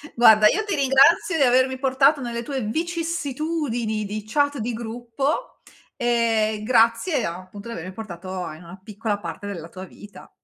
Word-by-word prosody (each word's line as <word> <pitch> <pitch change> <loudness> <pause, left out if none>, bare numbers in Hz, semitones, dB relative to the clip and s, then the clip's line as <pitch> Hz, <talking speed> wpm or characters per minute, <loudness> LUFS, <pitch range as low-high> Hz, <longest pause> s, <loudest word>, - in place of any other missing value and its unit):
Guarda, 220 -3 +7
io 435 - +1
ti 410 -4 -2
ringrazio 275 +5 +4
di - - 0
avermi 260 +1 +3
portato 270 +2 +3
nelle 235 -1 -4
tue 270 +1 -4
vicissitudini 300 -5 -2
di 210 +1 -5
chat 285 +2 +1
di 235 +3 -2
gruppo. 240 - -3 0.4
Ehm, 225 -3 +1
grazie 230 +5 +2
a 170 +1 -4
appunto 200 +4 -11
di - - -5
avere 180 -2 -7
portato 185 -3 -6
a 155 - -6
in 160 - -14
una 180 +3 -12
piccola 210 0 -3
parte 205 0 -7
della 170 -5 -7
tua 185 +2 -9
vita. 205 +2 -14
235 Hz, 165 wpm, -23 LUFS, 210-275 Hz, 0.4 s, Guarda